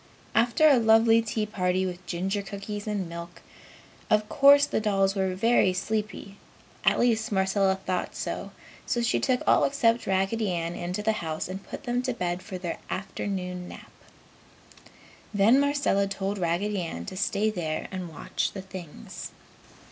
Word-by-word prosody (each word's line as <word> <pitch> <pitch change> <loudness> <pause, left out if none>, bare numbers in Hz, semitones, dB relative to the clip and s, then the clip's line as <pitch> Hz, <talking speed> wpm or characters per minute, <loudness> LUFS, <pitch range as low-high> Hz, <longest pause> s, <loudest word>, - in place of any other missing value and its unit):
After 235 +7 +4
a 280 -4 +6
lovely 225 0 +5
tea 220 -1 -2
party 185 -3 0
with 180 0 -5
ginger 190 +4 -1
cookies 200 +1 -6
and 205 -4 -2
milk, 170 +1 -9 0.7
of 210 0 +3
course 285 0 +7
the - - -1
dolls 195 -2 +2
were 190 -2 -1
very 225 -2 +3
sleepy, 205 +1 -3 0.5
at - - +3
least 230 -1 +2
Marcella 190 0 +2
thought 185 -1 -3
so, - - -4 0.4
so 240 - 0
she 235 - +2
took 255 -1 +1
all - - +4
except 240 -4 +2
Raggedy 195 +2 +1
Ann 170 0 -2
into 180 +4 -4
the 220 - +3
house 160 -1 -3
and 190 +2 -6
put - - -8
them 245 -2 0
to 255 -1 -2
bed 180 -3 -2
for 190 -2 -7
the 175 -2 -4
afternoon 185 -2 -4
nap. - - -12 1.4
Then 215 +7 +5
Marcella 280 -9 +2
told 195 +1 -3
Raggedy 185 +4 0
Ann 85 - -5
to - - -7
stay 205 +2 +1
there 160 -5 -3
and 185 -2 -5
watch 155 - -3
the 195 - -6
things. 185 -5 -8
195 Hz, 160 wpm, -27 LUFS, 185-225 Hz, 1.4 s, course